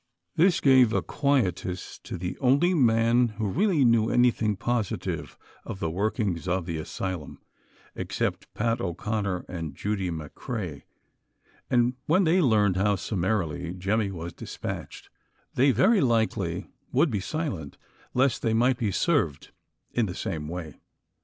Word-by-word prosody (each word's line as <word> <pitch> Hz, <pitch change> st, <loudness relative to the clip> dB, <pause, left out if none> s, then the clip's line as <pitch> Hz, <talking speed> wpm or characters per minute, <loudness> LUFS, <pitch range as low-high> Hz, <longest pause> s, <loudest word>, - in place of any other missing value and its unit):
This 180 Hz, +2 st, +4 dB
gave 130 Hz, -5 st, +6 dB
a -, -, +1 dB
quietus 100 Hz, -, -1 dB
to -, -, -5 dB
the 90 Hz, +1 st, -4 dB
only 145 Hz, +7 st, +3 dB
man 120 Hz, -4 st, +4 dB
who 110 Hz, -2 st, -1 dB
really 170 Hz, -, +2 dB
knew 115 Hz, -1 st, +4 dB
anything 115 Hz, -4 st, +3 dB
positive 115 Hz, 0 st, -2 dB, 0.3 s
of 95 Hz, -, -7 dB
the 80 Hz, -, -1 dB
workings 100 Hz, -2 st, -1 dB
of 90 Hz, -1 st, 0 dB
the 85 Hz, -2 st, -3 dB
asylum, 85 Hz, 0 st, -5 dB, 0.5 s
except -, -, -3 dB
Pat 115 Hz, 0 st, 0 dB
O 85 Hz, -3 st, -2 dB
'Conner 100 Hz, -3 st, -2 dB
and 80 Hz, -5 st, -5 dB
Judy 100 Hz, -1 st, -2 dB
McCrea, 85 Hz, -, -5 dB, 0.9 s
and 120 Hz, 0 st, +3 dB
when 185 Hz, +5 st, +4 dB
they 175 Hz, +2 st, +4 dB
learned 105 Hz, -, +3 dB
how 100 Hz, +2 st, +3 dB
summarily 90 Hz, -4 st, -2 dB
Jemmy 100 Hz, +3 st, 0 dB
was 85 Hz, -3 st, -6 dB
dispatched, -, -, -7 dB, 0.4 s
they 135 Hz, +3 st, +4 dB
very 135 Hz, -, +4 dB
likely 110 Hz, -, 0 dB, 0.2 s
would 140 Hz, +3 st, +3 dB
be 105 Hz, -, 0 dB
silent, 95 Hz, -, -4 dB, 0.4 s
lest 130 Hz, -1 st, +2 dB
they 110 Hz, -1 st, +1 dB
might 125 Hz, +2 st, +3 dB
be 110 Hz, -, 0 dB
served 115 Hz, -, 0 dB, 0.4 s
in 120 Hz, -3 st, +1 dB
the 90 Hz, -, -5 dB
same 80 Hz, -8 st, -4 dB
way. 85 Hz, -2 st, -6 dB
110 Hz, 140 wpm, -27 LUFS, 90-125 Hz, 0.9 s, gave